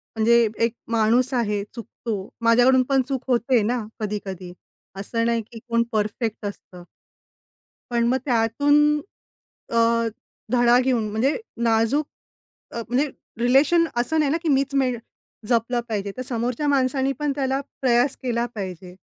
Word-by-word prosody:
म्हणजे 235 Hz, +2 st, +4 dB, 0.2 s
एक 230 Hz, -, -2 dB, 0.2 s
माणूस 235 Hz, +4 st, +2 dB
आहे. 210 Hz, -5 st, 0 dB
चुकतो 230 Hz, -1 st, -5 dB, 0.3 s
माझ्याकडून 250 Hz, +3 st, +5 dB
पण 270 Hz, -1 st, +4 dB
चूक 265 Hz, -2 st, -2 dB
होते 245 Hz, -1 st, +2 dB
ना, 250 Hz, -, 0 dB, 0.2 s
कधी-कधी. 195 Hz, -4 st, -5 dB, 0.5 s
असं 230 Hz, +3 st, -1 dB
नाही 235 Hz, 0 st, +1 dB
की 230 Hz, -, -9 dB
कोण 230 Hz, 0 st, +2 dB
परफेक्ट 215 Hz, +1 st, -2 dB
असतं? 185 Hz, -3 st, -8 dB, 1.1 s
पण 235 Hz, -1 st, +1 dB
मग 255 Hz, +2 st, +2 dB
त्यातून 245 Hz, +3 st, +2 dB, 1.0 s
अ, 230 Hz, 0 st, +2 dB, 0.4 s
धडा 245 Hz, -1 st, +5 dB
घेऊन 250 Hz, -4 st, 0 dB
म्हणजे 240 Hz, +7 st, +1 dB, 0.3 s
नाजूक 230 Hz, +6 st, +2 dB, 0.7 s
अ, 235 Hz, -, -4 dB
म्हणजे 265 Hz, +5 st, +1 dB, 0.3 s
रिलेशन 280 Hz, +8 st, +4 dB
असं 245 Hz, +7 st, +1 dB
नाही 300 Hz, -3 st, +2 dB
ना 310 Hz, -, +2 dB
की 335 Hz, -, -2 dB
मीच 275 Hz, -1 st, +1 dB
मेन 255 Hz, -3 st, +1 dB, 0.5 s
जपलं 240 Hz, 0 st, +1 dB
पाहिजे. 200 Hz, -2 st, -3 dB
तर 255 Hz, -, -4 dB
समोरच्या 245 Hz, +3 st, -2 dB
माणसांनी 270 Hz, -1 st, +1 dB
पण 295 Hz, -1 st, 0 dB
त्याला 270 Hz, -1 st, 0 dB, 0.2 s
प्रयास 250 Hz, +1 st, +3 dB
केला 240 Hz, -2 st, 0 dB
पाहिजे. 185 Hz, -3 st, -7 dB
240 Hz, 140 wpm, -23 LUFS, 225-265 Hz, 1.1 s, माझ्याकडून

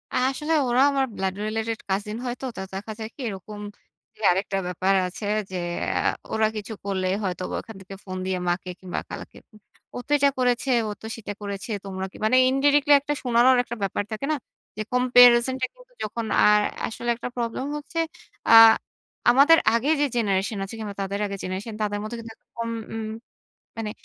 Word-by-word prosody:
আসলে 270 Hz, +5 st, 0 dB
ওরা 245 Hz, +2 st, +3 dB
আমার 275 Hz, -1 st, +1 dB
ব্লাড 190 Hz, -1 st, -1 dB
রিলেটেড 225 Hz, +1 st, -2 dB
কাজিন 205 Hz, +3 st, -2 dB
হয়তো। 250 Hz, +2 st, -4 dB
তো -, -, -3 dB
দেখা 200 Hz, +3 st, -5 dB
যায় 220 Hz, 0 st, -5 dB
কি? 280 Hz, -, -9 dB
এরকম 205 Hz, +1 st, -8 dB, 0.6 s
জি, -, -, -26 dB
আরেকটা 195 Hz, +1 st, -1 dB
ব্যাপার 185 Hz, +2 st, +1 dB
আছে 195 Hz, +4 st, -7 dB, 0.3 s
যে, 185 Hz, -, -3 dB, 0.4 s
আ -, -, +1 dB, 0.3 s
ওরা 220 Hz, 0 st, +3 dB
কিছু 215 Hz, +1 st, -5 dB
করলে, 190 Hz, -2 st, -1 dB, 0.2 s
হয়তোবা 185 Hz, -1 st, -3 dB
ওখান 225 Hz, -, -12 dB
থেকে 195 Hz, +1 st, -10 dB
ফোন 185 Hz, -1 st, -5 dB
দিয়ে 185 Hz, -1 st, -1 dB
মাকে 180 Hz, +1 st, -2 dB
কিংবা 185 Hz, -1 st, -4 dB
খালাকে -, -, -8 dB, 0.2 s
উগ 215 Hz, -, -18 dB, 0.3 s
"ও -, -, -3 dB
তো -, -, -9 dB
এটা 280 Hz, 0 st, +4 dB
করেছে, 250 Hz, +1 st, +1 dB, 0.2 s
ও -, -, -3 dB
তো -, -, -10 dB
সেটা 210 Hz, -2 st, -6 dB
করেছে। 200 Hz, +2 st, -5 dB
তোমরা 190 Hz, -1 st, -4 dB
কি।" -, -, -13 dB
মানে 235 Hz, +4 st, +3 dB
ইনডিরেক্টলি 285 Hz, +2 st, +4 dB
একটা 295 Hz, +1 st, -2 dB
শোনানোর 245 Hz, +1 st, +5 dB
একটা 240 Hz, -, -6 dB
ব্যাপার 195 Hz, +1 st, -1 dB
থাকে 220 Hz, +5 st, -3 dB
না? -, -, +2 dB, 0.4 s
যে, 215 Hz, -, -2 dB
কম্পেয়ারিসন 245 Hz, 0 st, +6 dB
টা -, -, +3 dB
কিন্তু -, -, -20 dB
যখন 225 Hz, +2 st, -3 dB, 0.2 s
আর 210 Hz, 0 st, +6 dB, 0.3 s
আসলে 240 Hz, +2 st, -5 dB
একটা 235 Hz, -, -6 dB
প্রবলেম 235 Hz, +2 st, -2 dB
হচ্ছে, 295 Hz, +3 st, -5 dB, 0.5 s
আ -, -, +7 dB, 0.8 s
আমাদের 285 Hz, +6 st, +7 dB, 0.2 s
আগে 240 Hz, +5 st, +1 dB
যে, 290 Hz, -, +4 dB
জেনারেশন 200 Hz, -2 st, 0 dB
আছে, 195 Hz, +4 st, -7 dB
কিংবা 205 Hz, -2 st, -5 dB
তাদের 195 Hz, +1 st, -3 dB
আগের 200 Hz, -1 st, -5 dB
জেনারেশন, 190 Hz, +4 st, -4 dB
তাদের 205 Hz, -1 st, -1 dB
মধ্যে 215 Hz, +2 st, -5 dB
কিন্তু 225 Hz, -1 st, -9 dB
এরকম 230 Hz, 0 st, -7 dB, 0.2 s
উম 220 Hz, -1 st, -4 dB, 0.7 s
মানে 225 Hz, -2 st, -3 dB
220 Hz, 185 wpm, -24 LUFS, 195-250 Hz, 0.8 s, আ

